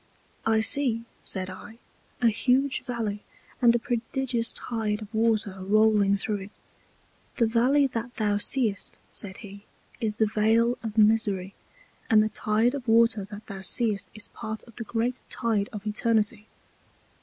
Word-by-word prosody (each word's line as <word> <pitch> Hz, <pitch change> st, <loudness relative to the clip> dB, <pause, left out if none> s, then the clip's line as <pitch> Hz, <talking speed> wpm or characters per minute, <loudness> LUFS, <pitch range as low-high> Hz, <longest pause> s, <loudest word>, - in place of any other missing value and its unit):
I 220 Hz, 0 st, +3 dB
see, 235 Hz, -2 st, +2 dB, 0.2 s
said 185 Hz, -1 st, 0 dB
I, 205 Hz, +4 st, -11 dB, 0.5 s
a 235 Hz, -, +6 dB
huge 260 Hz, +5 st, +1 dB
Valley, 220 Hz, -4 st, -3 dB, 0.4 s
and 235 Hz, -1 st, +6 dB
a -, -, +4 dB
prodigious 235 Hz, 0 st, -2 dB
Tide 220 Hz, -2 st, -3 dB
of 210 Hz, +2 st, -13 dB
Water 220 Hz, -3 st, +1 dB
rolling 205 Hz, 0 st, +3 dB
through 210 Hz, +1 st, -2 dB
it. 195 Hz, +1 st, -11 dB, 0.8 s
The 235 Hz, -, +4 dB
Valley 250 Hz, +6 st, +3 dB
that 240 Hz, -2 st, -4 dB
thou 205 Hz, -2 st, +1 dB
seest, 215 Hz, -2 st, 0 dB
said 195 Hz, 0 st, -5 dB
he, 200 Hz, 0 st, -11 dB, 0.4 s
is 220 Hz, -3 st, +1 dB
the 220 Hz, -, +2 dB
Vale 225 Hz, +3 st, +2 dB
of 225 Hz, -2 st, -6 dB
Misery, 210 Hz, -3 st, +3 dB, 0.6 s
and 215 Hz, -2 st, +6 dB
the 215 Hz, -, 0 dB
Tide 220 Hz, +4 st, +1 dB
of 270 Hz, -3 st, -6 dB
Water 225 Hz, -2 st, +4 dB
that 205 Hz, +2 st, -10 dB
thou 195 Hz, -2 st, -8 dB
seest 200 Hz, -1 st, 0 dB
is 210 Hz, -, -5 dB
part 220 Hz, 0 st, -6 dB
of 235 Hz, -3 st, -18 dB
the 235 Hz, -, -4 dB
great 240 Hz, +3 st, -2 dB
Tide 220 Hz, -4 st, 0 dB
of 210 Hz, -1 st, -8 dB
Eternity. 215 Hz, 0 st, 0 dB
220 Hz, 155 wpm, -26 LUFS, 210-235 Hz, 0.8 s, a